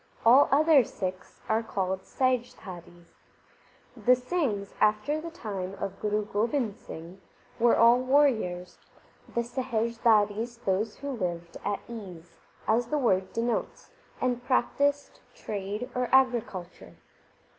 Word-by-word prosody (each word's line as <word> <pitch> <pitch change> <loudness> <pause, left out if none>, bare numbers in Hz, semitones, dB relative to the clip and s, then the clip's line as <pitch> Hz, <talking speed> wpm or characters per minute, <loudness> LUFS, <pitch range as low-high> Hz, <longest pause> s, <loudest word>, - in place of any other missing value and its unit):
All 255 +5 +7
other 300 -1 +6
Sikhs 185 -4 -6
are 220 +1 +2
called 190 -4 -2
Sahijdharis. 185 -10 -3 0.8
The 250 +1 +4
Singhs, 250 - -2
after 215 +9 +2
the 335 - -6
time 200 - -5
of 195 0 -5
Guru 210 0 -1
Gobind 220 +1 -1
Singh, 175 -4 -10 0.4
were 235 0 +4
all 235 +2 +6
warriors, 255 -10 +1 0.6
the 235 - +1
Sahijdharis 230 -2 0
those 205 +3 0
who 280 0 -5
lived 175 -7 -4
at 205 0 -2
ease, 185 -8 -10 0.3
as 230 +2 +2
the 300 - 0
word 190 -8 +1
denotes, 230 0 -2 0.3
and 245 -1 -1
practised 280 +3 0 0.2
trade 205 +3 -4
or 250 0 -1
agricul 240 -9 +2
ture. - - -15
225 Hz, 120 wpm, -28 LUFS, 195-250 Hz, 0.8 s, All